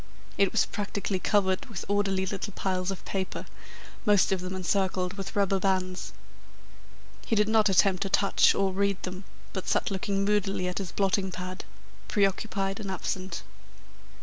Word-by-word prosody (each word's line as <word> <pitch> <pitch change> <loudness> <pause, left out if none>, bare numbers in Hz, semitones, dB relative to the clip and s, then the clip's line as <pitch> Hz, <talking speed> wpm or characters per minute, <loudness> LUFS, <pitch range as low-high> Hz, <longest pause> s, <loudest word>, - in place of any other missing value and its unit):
It 195 -2 +3
was - - +3
practically 200 -2 -3
covered 190 +1 +1
with 220 -7 -6
orderly 195 -2 +1
little 195 +2 -4
piles 185 -1 -1
of 195 - -4
paper, 190 -1 -3 0.6
most 205 -3 +4
of 190 -2 +1
them 185 +1 -4
encircled 185 0 0
with 195 -1 -6
rubber 195 -1 +2
bands. 185 -1 -1 1.2
He 225 - +2
did 210 0 +3
not 220 -1 +4
attempt 190 0 +4
to 195 - 0
touch 195 +1 +4
or 195 -1 +1
read 200 0 +1
them, 185 +1 -5 0.3
but 190 - -4
sat - - +1
looking 195 +1 0
moodily 200 -3 +1
at 180 - -2
his 190 -4 -4
blotting 195 -1 +1
pad, 185 0 -6 0.4
preoccupied 195 -1 0
and 200 -3 -5
absent. 190 0 -3
195 Hz, 155 wpm, -28 LUFS, 185-200 Hz, 1.2 s, most